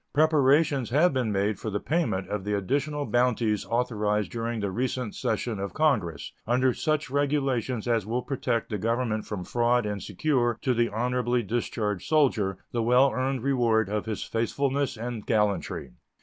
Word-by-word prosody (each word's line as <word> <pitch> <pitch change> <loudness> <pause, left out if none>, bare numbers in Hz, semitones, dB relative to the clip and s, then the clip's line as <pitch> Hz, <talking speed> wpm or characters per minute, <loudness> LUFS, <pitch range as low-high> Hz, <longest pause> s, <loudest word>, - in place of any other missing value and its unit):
Preparations 145 -2 +3
have 150 +6 +3
been 125 -5 0
made 100 +1 0
for 110 - -4
the 105 0 -2
payment 150 - -1
of 105 -2 -3
the 105 +1 -1
additional 145 +8 -1
bounties 120 -4 +1
authorized 105 -3 0
during 115 0 -3
the 100 -2 -2
recent 125 0 -2
session 110 -1 -2
of 100 0 -5
Congress, 95 - 0
under 125 +2 +3
such 155 -1 -1
regulations 135 -5 0
as 115 -3 +2
will 120 +5 -2
protect 125 -5 -2
the 105 - -2
Government 115 0 -1
from 100 -4 -4
fraud 120 +3 +1
and 105 -1 -3
secure 120 - 0
to 130 - +2
the 120 0 +1
honorably 125 +1 0
discharged 105 -2 -2
soldier 115 -11 +2
the 120 - -1
well 125 +4 +4
earned 130 -1 -1
reward 115 -6 +2
of 105 +1 -2
his 110 -2 -3
faithfulness 135 +3 -1
and 115 -1 -5
gallantry. 105 - 0
120 Hz, 165 wpm, -27 LUFS, 105-130 Hz, -, well